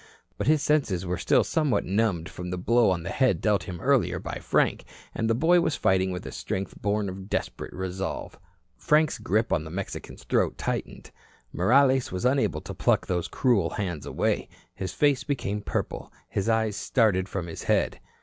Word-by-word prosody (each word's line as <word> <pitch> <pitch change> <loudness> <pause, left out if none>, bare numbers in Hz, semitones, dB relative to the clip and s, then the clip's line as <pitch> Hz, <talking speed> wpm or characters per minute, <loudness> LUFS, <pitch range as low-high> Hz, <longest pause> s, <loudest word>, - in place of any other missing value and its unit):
But - - -3
his 155 -1 +4
senses 110 - +1
were 90 0 -2
still - - +3
somewhat 150 -5 +1
numbed 95 -4 0
from 90 -1 -7
the 90 - -3
blow 115 +5 +3
on 90 -3 0
the 85 - -4
head 130 -10 +2
dealt 100 -6 +1
him 90 -1 -6
earlier - - +2
by - - -5
Frank, - - +1 0.3
and 115 0 -1
the 115 - +3
boy 170 +7 +4
was 160 - 0
fighting 95 0 +2
with 90 -1 -5
a - - -6
strength 95 +1 -4
born 105 0 0
of 95 +1 -7
desperate - - -3
resolve. 95 +1 -5 0.4
Frank's 155 0 +2
grip 110 +2 +1
on 80 -4 +1
the 80 - -8
Mexican's 95 +4 -6
throat - - +1
tightened. - - -4 0.4
Morales 130 +7 +3
was 90 +5 -3
unable 135 +2 +2
to - - -7
pluck - - +2
those 90 -2 -1
cruel 120 -7 +2
hands 90 -8 -4
away. - - -1 0.2
His 95 -2 -4
face 145 -3 +2
became 105 -8 -2
purple. - - -4 0.2
His 100 +3 -1
eyes 110 -2 +1
started 100 -7 +1
from 95 -4 -3
his 85 - -7
head. - - +1
100 Hz, 185 wpm, -26 LUFS, 90-125 Hz, 0.4 s, his